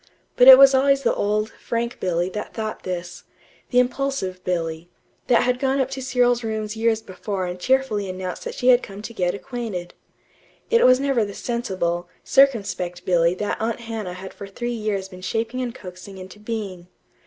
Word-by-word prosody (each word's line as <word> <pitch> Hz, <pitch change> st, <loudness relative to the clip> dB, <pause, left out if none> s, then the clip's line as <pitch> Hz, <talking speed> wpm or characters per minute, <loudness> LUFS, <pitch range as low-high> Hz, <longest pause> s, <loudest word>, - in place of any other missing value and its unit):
But 250 Hz, -, +6 dB
it 260 Hz, -1 st, +13 dB
was 275 Hz, 0 st, +8 dB
always 275 Hz, +1 st, +3 dB
the -, -, +2 dB
old, 215 Hz, +1 st, 0 dB
frank 235 Hz, +1 st, -4 dB
Billy 175 Hz, -1 st, 0 dB
that 210 Hz, +2 st, -6 dB
thought 215 Hz, -1 st, -4 dB
this; 175 Hz, -1 st, -6 dB, 0.5 s
the 250 Hz, -, 0 dB
impulsive 250 Hz, -7 st, 0 dB
Billy, 165 Hz, -1 st, -3 dB, 0.4 s
that 240 Hz, -, +4 dB
had 250 Hz, 0 st, 0 dB
gone 270 Hz, +1 st, +1 dB
up 265 Hz, 0 st, 0 dB
to 270 Hz, 0 st, -5 dB
Cyril's 245 Hz, -1 st, +2 dB
rooms 220 Hz, -1 st, -3 dB
years 225 Hz, 0 st, +1 dB
before 190 Hz, 0 st, -4 dB
and 180 Hz, 0 st, -5 dB
cheerfully 245 Hz, -4 st, +1 dB
announced 185 Hz, 0 st, -5 dB
that -, -, -5 dB
she 250 Hz, -, +2 dB
had 250 Hz, 0 st, +6 dB
come 200 Hz, +1 st, -9 dB
to 230 Hz, -, -7 dB
get 180 Hz, -4 st, 0 dB
acquainted. 220 Hz, -7 st, -6 dB, 0.8 s
It 465 Hz, -, +5 dB
was 255 Hz, 0 st, +6 dB
never 275 Hz, -4 st, +1 dB
the 200 Hz, -1 st, -6 dB
sensible, 185 Hz, -7 st, -2 dB
circumspect 200 Hz, -10 st, +2 dB
Billy 170 Hz, -1 st, +3 dB
that 205 Hz, +3 st, -3 dB
Aunt 230 Hz, +1 st, -2 dB
Hannah 225 Hz, -5 st, -5 dB
had 190 Hz, +1 st, -9 dB
for 200 Hz, -, -9 dB
three 240 Hz, +5 st, -4 dB
years 210 Hz, -4 st, -2 dB
been 185 Hz, -1 st, -12 dB
shaping 225 Hz, +6 st, -2 dB
and 240 Hz, -2 st, -4 dB
coaxing 185 Hz, +1 st, -10 dB
into 185 Hz, +2 st, -11 dB
being. 210 Hz, -5 st, -5 dB
215 Hz, 185 wpm, -23 LUFS, 185-245 Hz, 0.8 s, it